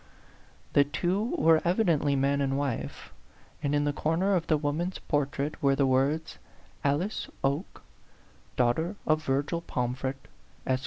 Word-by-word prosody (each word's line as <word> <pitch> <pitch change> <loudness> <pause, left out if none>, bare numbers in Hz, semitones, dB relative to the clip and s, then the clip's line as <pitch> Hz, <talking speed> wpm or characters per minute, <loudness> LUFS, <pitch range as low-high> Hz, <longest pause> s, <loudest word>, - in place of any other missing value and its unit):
The 145 - +6
two 190 - -1
were 165 - +5
evidently 170 -6 +2
man 140 +1 +1
and 135 0 0
wife; 140 -4 -4 0.5
and 145 -1 0
in 145 - +2
the 145 0 0
corner 170 +7 +1
of 175 -3 0
the 155 - +3
woman's 155 +5 -2
portrait 145 0 -2
were 140 -1 +3
the 140 - +2
words, 135 +5 +1 0.2
" - - -29
Alice 150 +9 0
Oke, 140 +6 -2 0.7
daughter 160 - +1
of 155 0 +2
Virgil 145 +4 0
Pom 125 -6 -2
fret, 135 +1 -3 0.5
Esq. 130 -1 +1
145 Hz, 150 wpm, -28 LUFS, 140-165 Hz, 0.7 s, The